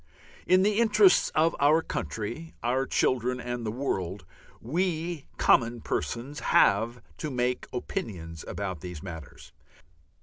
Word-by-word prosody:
In 185 +1 +5
the 210 +2 +2
interests 210 -5 +5
of 160 +2 +3
our 155 +3 +4
country, 120 +9 -5
our 130 +3 +1
children, 125 0 +1
and 120 0 -4
the 110 - -2
world, 95 -7 -3 0.3
we 165 +2 -2
common 120 0 +3
persons 130 +6 -3
have 115 +4 +3 0.2
to 155 - -3
have 125 +1 0
opinions 85 -9 -5
about 95 -2 -4
these 90 -2 -8
matters. 80 -6 -9
125 Hz, 125 wpm, -28 LUFS, 105-155 Hz, 0.3 s, In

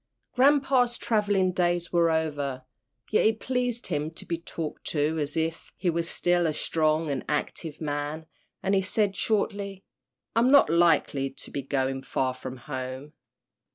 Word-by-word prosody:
Grampa's 265 -2 +4
travelling 205 -4 +1
days 175 -1 0
were 170 -1 +4
over, 145 -5 -1 0.5
yet 215 - +4
it 220 0 +2
pleased 250 -2 -1
him 150 -3 -1
to 160 - -9
be 170 -1 -3
talked 165 -2 -6
to 155 +1 0
as 150 +1 -2
if 165 +1 -2
he 180 -2 +1
were 170 +1 0
still 175 +1 +1
a 155 - 0
strong 155 0 +1
and 135 -3 -2
active 150 +1 -3
man, 150 +1 -3 0.4
and 195 - +1
he 195 - +4
said, 200 +1 +1
shortly, 200 -2 -1 0.5
"I'm 235 +2 +4
not 280 - +6
likely 160 -5 +3
to 135 - -13
be 140 - -3
going 135 0 -1
far 130 -1 -1
from 130 0 -7
home." 130 +2 -6
165 Hz, 155 wpm, -27 LUFS, 145-195 Hz, 0.5 s, not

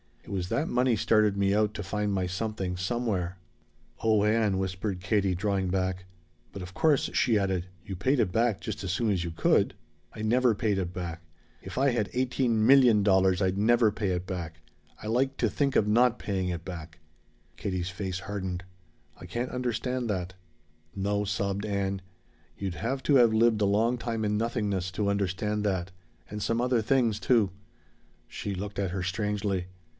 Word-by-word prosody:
It - - -15
was 95 -3 -3
that 140 +9 0
money 125 -1 +2
started 105 0 +3
me 100 0 +2
out 105 0 +2
to 105 - -4
find 105 +2 -1
my 95 -2 0
Something 95 0 -3
Somewhere." 95 -3 -1 0.7
"Oh 110 -2 +4
Ann!" 105 -2 +2
whispered 95 0 -3
Katie, 100 -2 +1
drawing 95 0 0
back. 95 0 -1 0.5
"But 100 - -6
of 90 +1 -9
course," 150 +2 +2
she 115 -4 +3
added, 95 -3 -1 0.2
"you 95 - -5
paid 130 +10 +1
it 105 -6 +2
back 110 -1 +1
just 100 0 -5
as 95 - -2
soon 110 +3 +1
as 90 -4 0
you 85 - -3
could?" 80 - +2 0.4
"I 110 - -7
never 120 +1 +3
paid 105 -1 0
it 90 -1 -3
back! 85 -2 -5 0.4
If - - -9
I 135 +2 +4
had 115 -4 -1
eighteen 125 -3 +1
million 125 -5 +6
dollars, 95 -1 +3
I'd 95 0 +1
never 115 +1 +4
pay 105 0 -2
it 90 0 -1
back! 85 -3 -6 0.4
I - - -5
like 135 +4 +1
to - - +1
think 140 -2 0
of 105 - +3
not 120 +3 +4
paying 95 -3 -2
it 85 -1 -4
back!" 85 -2 -8 0.6
Katie's 95 -2 -2
face 95 0 -4
hardened. 95 -3 -4 0.6
"I - - -9
can't 120 +8 -3
understand 125 0 -2
that." 95 -2 -2 0.6
"No," 100 +1 0
sobbed 100 +1 -1
Ann, 100 -2 -1 0.6
"you'd 95 -3 -3
have 130 +6 -3
to 145 - +3
have 120 -4 +6
lived 110 -1 +3
a - - +4
long 110 +5 +2
time 115 -2 -3
in 105 0 +1
nothingness 105 -5 -1
to 100 +1 -1
understand 100 +1 -1
that 95 -2 -1 0.4
and 105 0 -5
some 115 +2 0
other 125 -2 +2
things, 115 -2 +2
too." 110 -7 +3 0.8
She 100 -1 -5
looked 100 +1 -5
at 95 -3 -1
her 95 0 -2
strangely. 100 -1 -1
100 Hz, 180 wpm, -28 LUFS, 95-115 Hz, 0.8 s, million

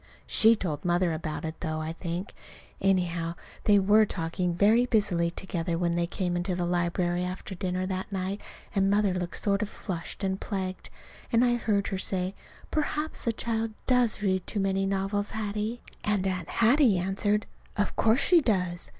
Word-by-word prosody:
She 225 +1 +5
told 160 -8 -3
Mother 175 -1 +2
about 155 0 -4
it, 160 0 -5
though, 155 0 -2
I 155 +1 -3
think. 170 +2 -5 0.5
Anyhow, 175 -3 +1 0.3
they 205 -1 +6
were 205 +3 +5
talking 170 +1 -2
very 220 +6 +4
busily 190 -7 +2
together 170 -1 -3
when 170 0 +1
they 170 0 0
came 180 -1 -2
into 175 +1 -1
the 175 -1 -1
library 175 0 0
after 185 +2 -5
dinner 185 0 -2
that 190 +1 -4
night, 195 +1 -3 0.3
and 195 -1 +2
Mother 205 -1 +3
looked 180 -1 -3
sort 200 -1 +1
of 210 - -2
flushed 180 -1 -5
and 190 0 -1
plagued, 190 -3 -4 0.4
and 235 +1 +4
I 240 - +3
heard 210 -4 0
her 190 - -2
say, 185 0 -1 0.4
"Perhaps 305 0 -2
the 230 - +3
child 225 -1 -2
does 245 -5 +2
read 190 -2 0
too 210 - -2
many 195 0 +1
novels, 195 +1 -1
Hattie." 215 +2 -3 0.2
And 205 -2 +1
Aunt 185 -3 -2
Hattie 235 -2 +4
answered, 200 +3 0 0.3
"Of 205 - 0
course 225 +4 +3
she 350 +1 +5
does!" 180 -8 0
190 Hz, 175 wpm, -28 LUFS, 175-210 Hz, 0.5 s, they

